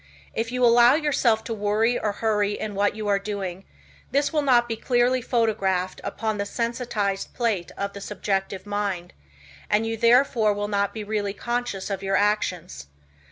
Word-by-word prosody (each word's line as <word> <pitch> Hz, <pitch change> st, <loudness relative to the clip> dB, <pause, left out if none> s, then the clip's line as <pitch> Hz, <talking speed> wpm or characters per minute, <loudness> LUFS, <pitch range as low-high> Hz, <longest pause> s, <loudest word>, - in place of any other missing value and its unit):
If 225 Hz, +1 st, -2 dB
you 250 Hz, 0 st, +2 dB
allow 240 Hz, +2 st, +6 dB
yourself 270 Hz, -8 st, +2 dB
to 230 Hz, -, -4 dB
worry 215 Hz, +3 st, +1 dB
or 210 Hz, -, 0 dB
hurry 210 Hz, -1 st, 0 dB
in 215 Hz, -, -4 dB
what 205 Hz, +1 st, +1 dB
you 215 Hz, -1 st, -4 dB
are 200 Hz, -1 st, +2 dB
doing, 195 Hz, -2 st, -5 dB, 0.4 s
this 280 Hz, +4 st, +1 dB
will 305 Hz, -, +2 dB
not 245 Hz, -4 st, +4 dB
be 230 Hz, -, -2 dB
clearly 245 Hz, +2 st, +1 dB
photographed 195 Hz, -7 st, 0 dB
upon 220 Hz, -2 st, -3 dB
the 200 Hz, -, -1 dB
sensitized 230 Hz, -5 st, -2 dB
plate 220 Hz, -8 st, -1 dB
of 200 Hz, 0 st, -3 dB
the 200 Hz, -, -8 dB
subjective 195 Hz, -1 st, -3 dB
mind, 205 Hz, -4 st, -3 dB, 0.6 s
and 210 Hz, +2 st, +2 dB
you 225 Hz, 0 st, -2 dB
therefore 230 Hz, -2 st, +4 dB
will 205 Hz, 0 st, -2 dB
not 200 Hz, -1 st, 0 dB
be 220 Hz, -, -6 dB
really 205 Hz, -1 st, -2 dB
conscious 235 Hz, -3 st, -3 dB
of 195 Hz, -1 st, -3 dB
your 195 Hz, 0 st, 0 dB
actions. 185 Hz, -, -1 dB
210 Hz, 170 wpm, -24 LUFS, 200-235 Hz, 0.6 s, allow